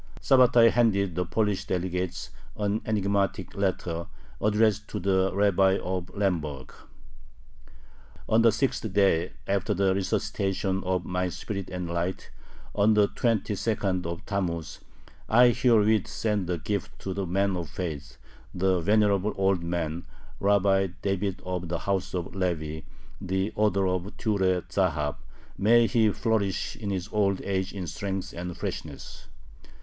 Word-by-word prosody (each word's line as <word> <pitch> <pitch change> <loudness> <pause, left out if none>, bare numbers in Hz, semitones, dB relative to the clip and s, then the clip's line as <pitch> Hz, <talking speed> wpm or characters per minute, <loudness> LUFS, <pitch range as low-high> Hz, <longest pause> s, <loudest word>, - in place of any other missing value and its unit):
Sabbatai 125 -3 +5
handed 100 -6 +2
the 90 +1 -2
Polish 105 -1 0
delegates 90 0 -3 0.3
an 105 +1 0
enigmatic 100 -3 0
letter, 90 -4 -2 0.3
addressed 105 0 +2
to - - -4
the 95 0 +2
Rabbi 95 -1 +3
of 90 0 -4
Lemberg: 75 -9 -2 1.5
On 110 +1 +4
the 115 -1 +6
sixth 110 -2 -1
day 95 -4 +2
after 100 +1 0
the 95 0 +2
resuscitation 95 0 -1
of 90 -1 0
my 90 0 -1
spirit 100 +1 -5
and 90 -1 -4
light, 85 +2 -3 0.4
on 105 +1 +3
the 105 -1 +4
twenty 115 -4 0
second 95 -4 -1
of 85 0 -6
Tammuz.... 85 -6 -3 0.5
I 120 +2 +7
herewith 110 -4 +3
send 105 -5 -1
a 90 - 0
gift 100 -1 -4
to 95 - -3
the 95 -1 -3
man 95 +2 +1
of 85 -2 -4
faith, 75 -6 -5 0.4
the 95 0 +2
venerable 105 +2 +2
old 95 -2 +2
man, 85 -1 -3 0.3
Rabbi 100 -1 +3 0.2
David 100 -1 -1
of 90 -1 -3
the 85 - -1
house 95 +1 -2
of 90 -2 -4
Levi, 80 -5 -2 0.4
the 95 +1 -1
author 105 -2 +2
of 90 +2 -3
Ture 95 -5 +1
Zahab 80 -8 -1 0.4
may 115 +3 +5
he 110 -2 +3
flourish 105 -4 -1
in 105 -3 -5
his 95 -1 -2
old 100 -3 +1
age 95 -1 -1
in 95 -3 -5
strength 95 +2 -4
and 90 0 -5
freshness! - - -6
95 Hz, 140 wpm, -27 LUFS, 90-105 Hz, 1.5 s, I